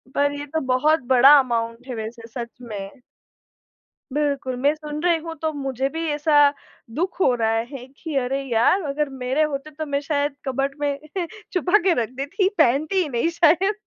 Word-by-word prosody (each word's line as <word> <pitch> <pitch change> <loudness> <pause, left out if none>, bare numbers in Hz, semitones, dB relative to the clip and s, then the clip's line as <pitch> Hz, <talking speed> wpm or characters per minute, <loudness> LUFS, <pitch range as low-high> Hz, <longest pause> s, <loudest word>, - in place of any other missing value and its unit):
पर 285 0 +2
ये 290 - -5
तो 320 +3 -2
बहुत 295 +5 +3
बड़ा 265 +3 +8
अमाउंट 235 0 -2
है, 250 - -5
वैसे 225 +1 -7
सच 235 0 -6
में। 215 +1 -8 1.1
बिल्कुल, 280 -3 -1
मैं 285 +2 +4
सुन 300 0 -6
रही 345 -2 +3
हूँ 330 0 -7
तो 315 -1 0
मुझे 270 -2 -2
भी 325 +2 -4
ऐसा 295 +1 0 0.6
दुःख 360 +5 -2
हो 255 - +4
रहा 225 -1 +1
है 265 -3 -7
कि 320 -4 -6
अरे 270 +2 -2
यार, 245 - +2
अगर 290 0 -1
मेरे 265 +3 -1
होते 300 0 -3
तो 310 +1 -5
मैं 280 -1 -1
शायद 285 -1 -1
कबर्ड 275 +1 -1
में 285 -1 -1 0.6
छुपा 360 +3 +3
के 370 - +5
रख 220 - -6
देती 285 +9 0
पहनती 310 +6 +3
ही 310 - -2
नहीं 240 +6 0
शायद। 360 +5 +4
280 Hz, 180 wpm, -23 LUFS, 255-310 Hz, 1.1 s, बड़ा